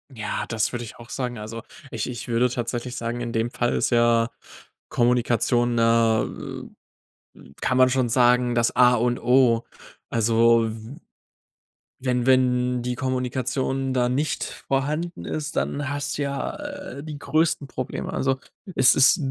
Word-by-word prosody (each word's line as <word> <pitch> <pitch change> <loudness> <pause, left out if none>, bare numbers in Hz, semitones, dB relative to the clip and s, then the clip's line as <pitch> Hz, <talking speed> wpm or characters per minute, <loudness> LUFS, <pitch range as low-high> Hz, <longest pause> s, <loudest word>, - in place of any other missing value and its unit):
Ja, 105 -2 -3
das 110 -2 -1
würde 120 0 -3
ich - - -11
auch 120 0 -13
sagen. 125 -3 -4
Also, 110 +2 -7 0.3
ich - - -3
ich 120 -2 -6
würde 120 +1 +2
tatsächlich 120 0 -4
sagen, 120 +1 -3
in 120 - -3
dem 115 +1 -1
Fall 120 -1 0
ist - - 0
ja 120 -1 +3 0.6
Kommunikation, 120 0 +2
äh, 115 -1 +3 1.4
kann 130 - +1
man 130 0 +6
schon 125 -2 0
sagen, 125 0 +3
das 120 0 +1
A 125 0 +6
und 120 +1 0
O. 125 -2 +3 0.5
Also, 115 0 +3
w 110 +5 -9 1.0
wenn 125 -1 -1
wenn 125 -1 +2
die 125 0 -2
Kommunikation 130 +1 -2
da 125 -1 +1
nicht 145 +4 -1 0.2
vorhanden 150 +6 -1
ist, 150 -2 -4
dann 145 -1 -1
hast 145 -1 -3
du, 145 - 0
ja, 140 0 -3
äh, 285 - -7
die 150 -1 -7
größten 145 0 0
Probleme. 130 -1 -5
Also, 135 0 0 0.4
es 130 0 +6
ist 135 +4 +6
125 Hz, 150 wpm, -24 LUFS, 120-130 Hz, 1.4 s, man